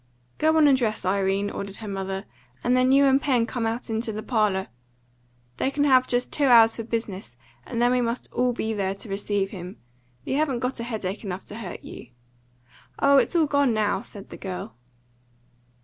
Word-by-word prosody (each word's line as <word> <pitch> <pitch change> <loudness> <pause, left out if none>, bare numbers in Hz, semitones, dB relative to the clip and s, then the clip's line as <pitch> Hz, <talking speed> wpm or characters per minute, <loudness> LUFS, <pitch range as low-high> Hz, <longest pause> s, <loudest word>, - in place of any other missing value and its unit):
"Go 315 +1 +3
on 305 -2 +6
and 275 - +6
dress, 225 -6 -1
Irene," 195 +1 0
ordered 200 0 -6
her 220 - -8
mother, 195 0 -4 0.4
"and 245 +1 +2
then 255 +1 +3
you 280 +1 +6
and 270 0 +4
Pen 250 -6 +2
come 230 -1 -2
out 230 +2 -3
into 225 0 -2
the 215 0 -5
parlour. 210 -5 0 0.9
They - - 0
can 285 +1 0
have 260 -3 +4
just 245 0 0
two 290 - +3
hours 230 -2 +7
for 230 - -4
business, 205 - -5 0.3
and 235 - -3
then 240 +1 +3
we 250 0 +2
must 235 +1 -2
all 250 0 +2
be 225 -2 -2
there 195 -2 -1
to 200 +2 -10
receive 200 0 -1
him. 180 -1 -8 0.5
You 265 - -1
haven't 295 -4 +1
got 250 +1 -3
headache 220 -4 -4
enough 190 -2 -5
to 210 - -9
hurt 200 -6 -7
you." - - -10 0.9
"Oh, 280 0 +5
it's 310 - +2
all 330 -2 +4
gone 285 -5 +2
now," 210 -1 +1
said 200 -1 -12
the - - -8
girl. 180 - -6
230 Hz, 195 wpm, -25 LUFS, 200-255 Hz, 0.9 s, hours